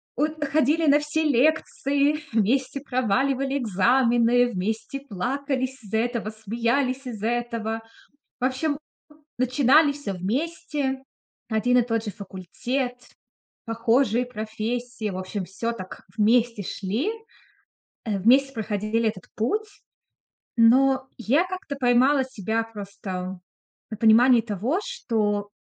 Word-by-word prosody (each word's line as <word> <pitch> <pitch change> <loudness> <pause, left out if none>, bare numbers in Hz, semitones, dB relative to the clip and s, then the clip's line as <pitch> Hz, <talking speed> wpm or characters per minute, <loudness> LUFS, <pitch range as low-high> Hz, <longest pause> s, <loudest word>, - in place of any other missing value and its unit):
от 305 +3 -1
ходили 305 +3 +2
на 290 +1 +6
все 300 +2 -1
лекции, 290 +1 +2
вместе 255 +5 +1
проваливали 265 +2 0
экзамены, 240 +2 +3
вместе 220 +7 -3
плакались 265 +3 -3
из-за 210 +1 -2
этого, 235 -1 -1
смеялись 235 +5 -1
из-за 220 -4 -4
этого. 230 -2 -2 0.6
В 250 - 0
общем 280 +3 0 0.6
начинали 265 +4 +4
всё 285 -9 -5
вместе. 270 - -2 0.5
Один 245 +3 +2
и - - +3
тот 225 -1 -1
же 210 - -3
факультет, 240 +7 -4 0.7
похожие 230 +1 +2
профессии. 225 0 -4
В 185 - -5
общем 185 +1 -4
всё 195 +6 -3
так 185 -5 -9
вместе 230 +1 +3
шли, 205 - -2 1.0
э, 210 -3 -1
вместе 270 +7 +4
проходили 220 0 -1
этот 185 -4 -8
путь. 425 - -1 0.9
Но 260 +3 +5
я 265 +8 +2
как-то 370 -5 -6
поймала 260 +2 +4
себя 225 -3 -2
просто 195 -4 -6 0.5
на 220 - -4
понимании 235 +2 +6
того, 230 - -1
что 210 - -1
240 Hz, 110 wpm, -25 LUFS, 220-275 Hz, 1.0 s, на